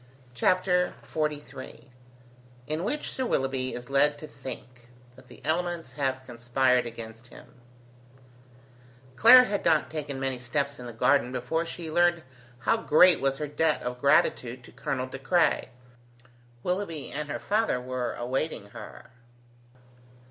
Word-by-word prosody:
CHAPTER 180 Hz, +6 st, +2 dB
XLIII 150 Hz, -4 st, -5 dB, 0.7 s
IN 155 Hz, +4 st, -3 dB
WHICH 290 Hz, +9 st, -2 dB
SIR 260 Hz, -1 st, -2 dB
WILLOUGHBY 130 Hz, -, -1 dB
IS 125 Hz, 0 st, -8 dB
LED 145 Hz, +2 st, +3 dB
TO 155 Hz, -, -9 dB
THINK 125 Hz, -4 st, -10 dB, 0.3 s
THAT 130 Hz, 0 st, -17 dB
THE -, -, -15 dB
ELEMENTS 170 Hz, -4 st, -1 dB
HAVE 130 Hz, -2 st, -2 dB
CONSPIRED 125 Hz, +1 st, +1 dB
AGAINST 115 Hz, 0 st, -9 dB
HIM -, -, -14 dB, 1.7 s
Clara 250 Hz, -, +9 dB
had 205 Hz, -5 st, -2 dB
not 155 Hz, -1 st, +2 dB
taken 150 Hz, -3 st, -4 dB
many 135 Hz, -2 st, -2 dB
steps 140 Hz, +3 st, -2 dB
in 125 Hz, -, -7 dB
the -, -, -6 dB
garden 125 Hz, +2 st, +2 dB
before 160 Hz, +7 st, -2 dB
she 165 Hz, -1 st, -6 dB
learned 175 Hz, 0 st, +3 dB, 0.4 s
how 225 Hz, -, +2 dB
great 180 Hz, -3 st, +5 dB
was 135 Hz, 0 st, +1 dB
her 150 Hz, -, -3 dB
debt 150 Hz, +2 st, 0 dB
of 125 Hz, 0 st, -5 dB
gratitude 130 Hz, -4 st, +2 dB
to -, -, -14 dB
Colonel 130 Hz, -2 st, -3 dB
De 130 Hz, +1 st, -8 dB
Craye. 170 Hz, +6 st, +2 dB, 0.9 s
Willoughby 180 Hz, -5 st, -3 dB
and 150 Hz, +1 st, -4 dB
her -, -, -2 dB
father 215 Hz, -, 0 dB
were 125 Hz, -1 st, -3 dB
awaiting 125 Hz, -2 st, -3 dB
her. -, -, -11 dB
140 Hz, 140 wpm, -27 LUFS, 125-165 Hz, 1.7 s, Clara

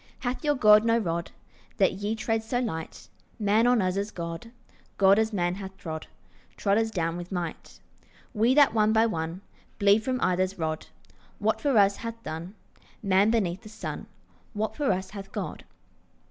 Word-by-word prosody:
Hath 250 Hz, +5 st, -3 dB
your 295 Hz, -1 st, +2 dB
God 215 Hz, -4 st, +6 dB
no 230 Hz, 0 st, +3 dB
rod, 170 Hz, -6 st, -2 dB, 0.5 s
That 190 Hz, -, +3 dB
ye 205 Hz, +3 st, -2 dB
tread 225 Hz, 0 st, -1 dB
so 235 Hz, +3 st, -2 dB
light? 160 Hz, -10 st, -5 dB, 0.3 s
Man 215 Hz, +2 st, +3 dB
on 245 Hz, -4 st, +4 dB
us 185 Hz, +1 st, 0 dB
as 200 Hz, +1 st, -1 dB
God, 170 Hz, +4 st, -6 dB, 0.5 s
God 195 Hz, +1 st, +6 dB
as 220 Hz, 0 st, +1 dB
man 175 Hz, -4 st, 0 dB
hath 190 Hz, 0 st, -8 dB
trod, 160 Hz, -3 st, -6 dB, 0.5 s
Trod 200 Hz, +1 st, +2 dB
us 225 Hz, 0 st, 0 dB
down 165 Hz, -5 st, -2 dB
with 175 Hz, +1 st, -8 dB
might. 175 Hz, -3 st, -5 dB, 0.5 s
We 235 Hz, +4 st, +3 dB
that 290 Hz, -4 st, +6 dB
one 215 Hz, -1 st, +3 dB
by 225 Hz, 0 st, +5 dB
one 165 Hz, -3 st, -3 dB, 0.4 s
Bleed 200 Hz, +2 st, +4 dB
from 255 Hz, +1 st, -1 dB
either's 185 Hz, 0 st, +1 dB
rod. 160 Hz, -2 st, -3 dB, 0.5 s
What -, -, 0 dB
for 280 Hz, -5 st, +2 dB
us 200 Hz, -1 st, +5 dB
hath 230 Hz, 0 st, -7 dB
done 170 Hz, +5 st, -6 dB, 0.5 s
Man 195 Hz, +1 st, +4 dB
beneath 200 Hz, -5 st, 0 dB
the 215 Hz, -, -12 dB
sun, 215 Hz, -, -6 dB, 0.5 s
What 215 Hz, 0 st, -2 dB
for 290 Hz, -6 st, +1 dB
us 190 Hz, 0 st, -2 dB
hath 195 Hz, -1 st, -8 dB
God? -, -, -5 dB
205 Hz, 175 wpm, -27 LUFS, 180-225 Hz, 0.5 s, God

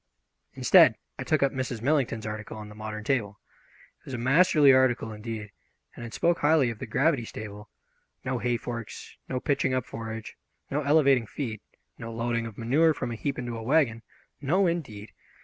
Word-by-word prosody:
Instead, -, -, +6 dB, 0.2 s
I -, -, -2 dB
took 155 Hz, -3 st, +1 dB
up 135 Hz, -, +3 dB
Mrs. 130 Hz, -4 st, -3 dB
Millington's 130 Hz, -6 st, +1 dB
article 110 Hz, 0 st, -6 dB
on 105 Hz, -1 st, -8 dB
the -, -, -11 dB
modern 110 Hz, 0 st, -7 dB
stable. 105 Hz, -7 st, -1 dB, 0.6 s
It -, -, -32 dB
was 135 Hz, -, -8 dB
a -, -, -3 dB
masterly 140 Hz, +2 st, +5 dB
article, 130 Hz, -4 st, +2 dB
indeed, 105 Hz, -1 st, -6 dB, 0.4 s
and -, -, -8 dB
it 115 Hz, -2 st, -7 dB
spoke 170 Hz, 0 st, +2 dB
highly 145 Hz, -5 st, +3 dB
of 110 Hz, -, -10 dB
the -, -, -6 dB
gravity 135 Hz, +3 st, +2 dB
stable. 105 Hz, -2 st, -8 dB, 0.6 s
No 125 Hz, -1 st, -1 dB
hay 120 Hz, 0 st, 0 dB
forks, 115 Hz, -2 st, -7 dB
no 130 Hz, -, -1 dB
pitching 135 Hz, -1 st, 0 dB
up 130 Hz, -, -1 dB
forage, 110 Hz, -1 st, -7 dB, 0.3 s
no 145 Hz, +2 st, 0 dB
elevating 140 Hz, -5 st, +3 dB
feed, 110 Hz, -6 st, -5 dB, 0.4 s
no 115 Hz, -, -6 dB
loading 115 Hz, 0 st, -2 dB
of 110 Hz, -, -11 dB
manure 150 Hz, +8 st, +3 dB
from 125 Hz, -2 st, -4 dB
a -, -, -3 dB
heap 140 Hz, +5 st, -3 dB
into 120 Hz, -1 st, -4 dB
a 115 Hz, -, -6 dB
wagon. 120 Hz, -2 st, +2 dB, 0.4 s
No, 175 Hz, +8 st, +2 dB
indeed! 130 Hz, -, -3 dB
120 Hz, 185 wpm, -27 LUFS, 110-140 Hz, 0.6 s, Instead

